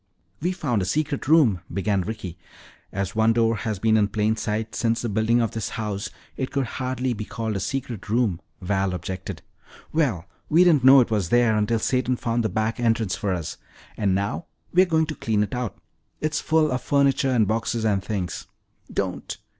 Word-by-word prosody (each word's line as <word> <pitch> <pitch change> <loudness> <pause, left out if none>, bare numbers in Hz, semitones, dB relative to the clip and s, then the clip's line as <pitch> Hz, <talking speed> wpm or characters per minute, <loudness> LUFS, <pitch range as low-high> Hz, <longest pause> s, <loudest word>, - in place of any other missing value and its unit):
"We've 180 +3 -1
found 120 - 0
a - - -1
secret 145 - -1
room 135 - +5
" - - -18
began 100 0 0
Ricky. 95 -3 -5 0.6
"As 100 0 -3
one 110 +1 +4
door 115 -1 +2
has 110 +1 -2
been 110 +2 +3
in 105 -1 +3
plain 110 +1 +1
sight 110 0 -3
since 115 0 0
the 120 - -1
building 110 +3 +2
of 115 - 0
this 110 -4 -3
house, 105 -3 -3 0.3
it 130 - -3
could 135 -1 -1
hardly 130 +1 -2
be 105 -1 -5
called 110 0 -4
a - - -1
secret 120 -4 -4
room," 110 -6 +1 0.2
Val 95 0 0
objected. 95 +2 -6 0.5
"Well, 125 - +1 0.2
we 165 +3 +6
didn't 160 -7 +4
know 135 +1 +9
it 120 - -1
was 100 -6 0
there 120 -2 +4
until 105 +2 +1
Satan 125 +2 +1
found 120 -1 -1
the 110 - 0
back 110 +5 -1
entrance 115 -4 +1
for 100 - -2
us. 85 -4 -3 0.4
And 100 -3 +1
now 100 - -2 0.3
we're 185 +1 +5
going 160 -2 +2
to 155 - -4
clean 110 -7 0
it 100 - -5
out. 125 -3 -3 0.4
It's 155 0 -1
full 155 -1 +2
of 125 0 -1
furniture 140 0 +2
and 115 -5 +3
boxes 115 +1 -1
and 100 -3 +1
things." 95 -6 -4 0.4
"Don't!" - - -3
115 Hz, 195 wpm, -24 LUFS, 105-130 Hz, 0.6 s, know